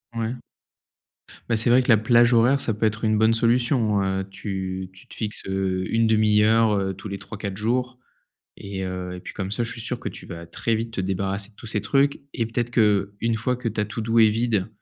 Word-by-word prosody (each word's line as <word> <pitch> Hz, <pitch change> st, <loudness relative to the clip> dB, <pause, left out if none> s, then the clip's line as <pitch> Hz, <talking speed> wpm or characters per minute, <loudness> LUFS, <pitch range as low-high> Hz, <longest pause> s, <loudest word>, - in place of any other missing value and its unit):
Ouais. 115 Hz, +2 st, -3 dB, 1.1 s
Bah 115 Hz, -, +1 dB
c'est 115 Hz, -, +1 dB
vrai 125 Hz, +2 st, +6 dB
que -, -, -6 dB
la 110 Hz, -, +7 dB
plage 120 Hz, +2 st, +4 dB
horaire, 125 Hz, +4 st, +4 dB
ça 115 Hz, -, -1 dB
peut 110 Hz, +2 st, -1 dB
être 110 Hz, +1 st, -1 dB
une 110 Hz, 0 st, +2 dB
bonne 110 Hz, +1 st, +4 dB
solution, 115 Hz, -2 st, +2 dB
heu, 95 Hz, 0 st, -1 dB
tu 95 Hz, -2 st, -5 dB
tu 95 Hz, -, -17 dB
te -, -, -13 dB
fixes, 105 Hz, -2 st, -3 dB
heu, 95 Hz, -1 st, -1 dB
1/2 110 Hz, -2 st, +3 dB
heure, 110 Hz, 0 st, +4 dB
heu 95 Hz, -1 st, -1 dB
tous 95 Hz, +3 st, -9 dB
les 100 Hz, -, -5 dB
3-4 100 Hz, -1 st, -6 dB
jours 125 Hz, +3 st, -1 dB, 0.6 s
et 100 Hz, -1 st, -5 dB
heu, 90 Hz, -1 st, -4 dB
et 90 Hz, -, -8 dB
puis -, -, -8 dB
comme 95 Hz, -1 st, -4 dB
ça, 120 Hz, -, 0 dB
je 115 Hz, -, -3 dB
suis 115 Hz, -, -7 dB
sûr 120 Hz, +1 st, -3 dB
que -, -, -4 dB
tu -, -, -10 dB
vas 85 Hz, -1 st, -8 dB
très 115 Hz, +6 st, -1 dB
vite 115 Hz, +1 st, -3 dB
te -, -, -1 dB
débarrasser 95 Hz, +2 st, -2 dB
de 105 Hz, -, -30 dB
tous -, -, -11 dB
ces 105 Hz, -1 st, -1 dB
trucs 140 Hz, +8 st, +1 dB
et 115 Hz, -, -1 dB
peut-être 120 Hz, +1 st, -2 dB
qu'une 105 Hz, 0 st, +1 dB
fois 125 Hz, +3 st, -1 dB
que 125 Hz, -1 st, -3 dB
ta 105 Hz, -1 st, -1 dB
to 105 Hz, +2 st, -6 dB
do 115 Hz, +1 st, +1 dB
est 110 Hz, -1 st, +7 dB
vide 110 Hz, -3 st, 0 dB
110 Hz, 230 wpm, -24 LUFS, 100-115 Hz, 1.1 s, la